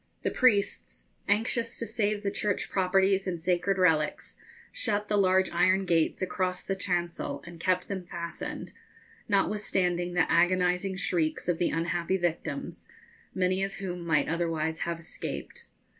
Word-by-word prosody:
The - - 0
priests, 215 -6 +1 0.2
anxious 230 +2 0
to 230 - -3
save 210 -2 -1
the 200 - 0
church 205 -1 -1
properties 190 +1 +2
and 175 -2 -2
sacred 180 +3 +1
relics, 160 -5 +1 0.4
shut 210 -2 -1
the 210 - +2
large 190 -1 +3
iron 185 +3 +3
gates 165 +1 +1
across 185 0 -1
the 195 - -2
chancel 175 -6 -2
and 170 -1 -10
kept 185 +1 +1
them 190 -3 -5
fastened, 170 -1 -5 0.6
notwithstanding 185 -3 +1
the 180 - +4
agonising 180 +3 +2
shrieks 170 -4 0
of 175 -2 +1
the 175 - +2
unhappy 170 +3 0
victims, 175 -2 -3 0.5
many 185 0 +1
of 195 0 -3
whom 180 -3 -5
might 155 -3 +2
otherwise 160 -1 -1
have 170 -1 -2
escaped. 165 - -6
180 Hz, 145 wpm, -28 LUFS, 170-195 Hz, 0.6 s, the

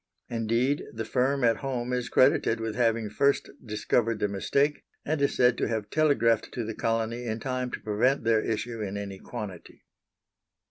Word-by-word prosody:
Indeed, 120 +5 0
the 115 0 -5
firm 130 +3 +1
at 115 -1 +4
home 125 -2 -3
is 125 -1 -1
credited 130 -3 +3
with 115 -1 -3
having 115 -1 +1
first 140 +7 +1
discovered 115 0 0
the 105 - 0
mistake, 140 +9 0 0.2
and 155 -1 -1
is 140 - +2
said 125 -1 +3
to - - +1
have 110 -2 -3
telegraphed 115 -8 +2
to 120 - -2
the 110 +1 -4
colony 115 +2 -1
in 110 0 -2
time 125 +1 -2
to - - -5
prevent 115 +6 +1
their 110 -1 +3
issue 115 +1 -3
in 100 -1 -3
any 100 -2 -6
quantity. 105 -8 -8
115 Hz, 175 wpm, -27 LUFS, 110-125 Hz, 0.2 s, at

